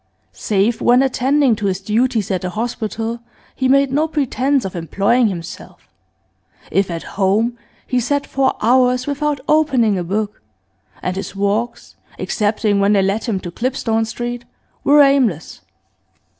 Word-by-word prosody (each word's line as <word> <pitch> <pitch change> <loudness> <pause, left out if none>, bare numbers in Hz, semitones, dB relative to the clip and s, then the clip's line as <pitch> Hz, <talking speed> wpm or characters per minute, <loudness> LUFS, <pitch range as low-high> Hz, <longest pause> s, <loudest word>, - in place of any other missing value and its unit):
Save 210 +3 0
when 245 +2 +4
attending 265 0 +2
to 205 - -2
his 190 -1 -1
duties 215 +1 0
at 185 -2 -1
the 180 - -3
hospital, 225 +1 -3 0.3
he 260 - -1
made 275 0 +4
no 300 +4 +1
pretence 280 -3 0
of 190 - -5
employing 200 +8 +1
himself; 170 -4 -8 0.8
if 195 -1 +1
at 165 -1 -4 0.2
home, 215 +5 +2 0.3
he 250 - 0
sat 280 +4 -1
for 270 -1 0
hours 250 +2 +3
without 290 -1 -2
opening 260 -10 +2
a - - -2
book, 205 +4 -3 0.6
and 180 - -2
his 195 - -6
walks, 205 +4 -2 0.2
excepting 210 -1 0
when 200 +1 +3
they 195 -2 +3
led 195 +3 -1
him 215 -6 -1
to 175 - -7
Clipstone 225 0 -1
Street, 240 +2 -5 0.4
were 290 0 +6
aimless. 255 - +1
230 Hz, 145 wpm, -18 LUFS, 200-260 Hz, 0.8 s, were